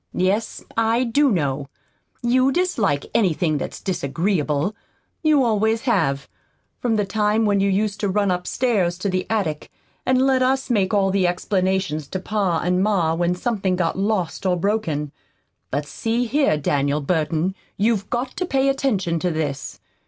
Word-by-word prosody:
"Yes, 200 +5 0
I 225 +2 +2
do 275 +4 +3
know. 140 -6 -1 0.6
You 255 +2 +3
dislike 230 - 0
anything 170 -7 +1
that's - - -5
disagreeable. 165 +1 -1 0.5
You 305 -4 +4
always 220 -1 +1
have, 160 - 0 0.5
from 235 -2 0
the 210 -1 +1
time 210 +2 +1
when 205 -1 +2
you 200 0 +2
used 200 +1 0
to 205 - 0
run 200 0 +1
upstairs 180 0 0
to 200 +2 -2
the 185 0 -1
attic 190 -9 -1 0.3
and 255 0 +2
let 265 0 +3
us 265 0 +1
make 195 -5 +2
all 195 -2 +2
the 190 -2 +2
explanations 185 -4 -1
to 185 - -4
pa 190 -3 0
and 180 +1 +1
ma 190 -6 +2
when 175 +1 0
something 195 -2 -1
got 175 -2 0
lost 195 -3 -1
or 185 -2 +1
broken. 170 -7 -1 0.6
But, 145 +2 -2
see 225 +11 -1
here, 275 - +2
Daniel 145 0 0
Burton, 160 +3 0 0.2
you've 210 -1 +1
GOT 250 +2 -2
to 365 - -1
pay 270 -2 +2
attention 205 -12 0
to 180 - 0
this. 145 -5 -3
195 Hz, 160 wpm, -22 LUFS, 170-225 Hz, 0.6 s, You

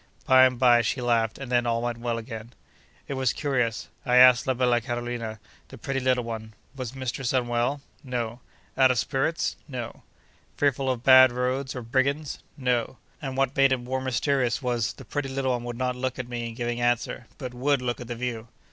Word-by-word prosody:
By 130 0 +7
and 125 -1 -4
by, 120 -1 +5
she 115 +3 -1
laughed, 115 -2 +1
and 135 -2 -7
then 120 -1 +2
all 115 0 0
went 120 -1 -2
well 120 -1 -2
again. 115 0 -8 0.5
It - - -3
was 130 -3 +1
curious. 125 -6 -1 0.2
I 125 -3 +1
asked 125 -1 +7
la 130 - +2
bella 120 -1 +2
Carolina, 120 -2 -4 0.3
the - - -12
pretty 135 -1 -2
little 125 -1 +1
one, 110 -1 -6 0.2
Was 130 -1 -6
mistress 130 -1 -3
unwell?—No.—Out 120 -1 -1
of 125 - +1
spirits?—No.—Fearful 135 0 -3
of 125 -2 -2
bad 130 -1 +8
roads, 130 +2 -2
or 125 - -5
brigands?—No. 130 -1 -1 0.2
And 135 -3 -5
what 135 0 +1
made 135 -1 +4
it 130 - +3
more 130 +2 -3
mysterious 130 -1 0
was, 120 -4 -1
the - - -13
pretty 145 -2 -3
little 135 -1 -1
one 120 -1 -2
would 120 -1 -5
not 125 0 -1
look 130 0 -3
at 125 -2 -5
me 120 -1 -4
in 115 - -10
giving 120 0 -2
answer, 120 0 0
but 130 -3 -6
would 140 +3 +1
look 120 0 -2
at 120 - -8
the 120 - -4
view. 115 -2 -4
125 Hz, 185 wpm, -26 LUFS, 120-130 Hz, 0.5 s, bad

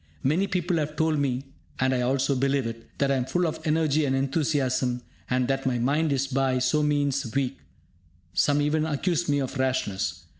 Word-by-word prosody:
Many 170 +9 +2
people 180 -2 0
have 150 -1 -2
told 160 -1 +1
me 135 -2 0 0.4
(and 130 0 +2
I 125 - +1
also 135 +2 +1
believe 135 0 +1
it) 115 0 -6
that 140 -1 +1
I 135 - +2
am 125 - -1
full 175 +7 0
of 160 - -2
energy 155 -1 +2
and 135 -1 +1
enthusiasm, 135 -3 0 0.3
and 125 -1 +1
that 135 0 -1
my 125 -2 +1
mind 145 +6 +1
is 135 -1 +1
by 135 -1 +1
so 130 +4 +2
means 145 -4 0
weak; 135 -1 -1 0.7
some 145 +11 +3
even 155 +1 +1
accuse 165 +2 0
me 145 - +3
of 135 0 -3
rashness. 130 -7 -1
140 Hz, 190 wpm, -26 LUFS, 130-150 Hz, 0.7 s, some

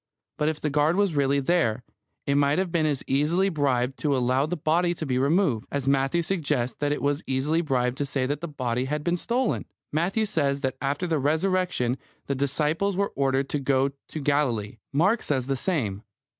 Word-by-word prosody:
But 150 - +2
if 155 - -3
the 150 - -2
guard 150 +3 +3
was 200 -5 +1
really 140 0 +2
there, 140 -6 +1 0.4
it 140 - +1
might 145 +1 +3
have 185 -2 0
been 160 -2 +2
as 145 -3 -1
easily 160 +8 +2
bribed 135 -5 0
to 145 -3 +1
allow 130 +3 +2
the 180 +2 -2
body 170 +3 +1
to 160 - -4
be 130 -3 0
removed, 140 - +2
as 140 -2 -2
Matthew 135 +5 +2
suggests 150 -9 -1
that 145 0 0
it 150 - -2
was 145 +1 +1
easily 140 +5 +1
bribed 130 -4 0
to 145 - 0
say 135 -1 -1
that 145 +3 -2
the 170 - -3
body 125 -4 -2
had 150 +2 -2
been 175 +1 +1
stolen. 240 +7 0 0.3
Matthew 180 +8 +1
says 140 -9 0
that 130 -2 -1
after 145 +5 -1
the 165 -3 0
Resurrection 160 -4 +1 0.3
the 140 - -1
disciples 150 +8 0
were 200 0 0
ordered 135 0 +1
to 145 - -1
go 135 0 +1 0.2
to 155 - -6
Galilee. 130 -8 0
Mark 190 +11 +2
says 130 -4 -1
the 135 +1 0
same. 125 - -1
145 Hz, 200 wpm, -26 LUFS, 135-165 Hz, 0.4 s, guard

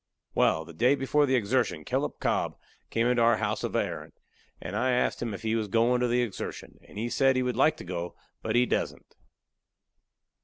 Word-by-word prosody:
Wal, 80 0 +2
the 85 - -11
day 125 - +3
before 145 +2 +2
the 130 - +3
exertion 110 -5 0
Kellup - - -2
Cobb - - 0 0.3
come 115 - +1
into 125 -1 +2
our 115 -1 +5
house - - -2
of - - -3
a - - +3
errant, - - -7 0.4
and 90 +5 -6
I 130 +4 +1
asked 125 - 0
him 120 -2 -2
if 100 +2 -7
he 110 0 0
was 110 -2 -1
goin' 115 +4 +2
to 125 - +2
the 120 +1 +2
exertion; 110 -6 -6
and - - -13
he 115 +3 -1
said 135 +2 +3
he 130 - +1
would 125 -2 -1
like 150 +5 +3
to - - -8
go, 85 -1 -5 0.3
but 110 0 -2
he 125 +1 +5
dassent. - - -3
120 Hz, 215 wpm, -28 LUFS, 105-125 Hz, 0.4 s, our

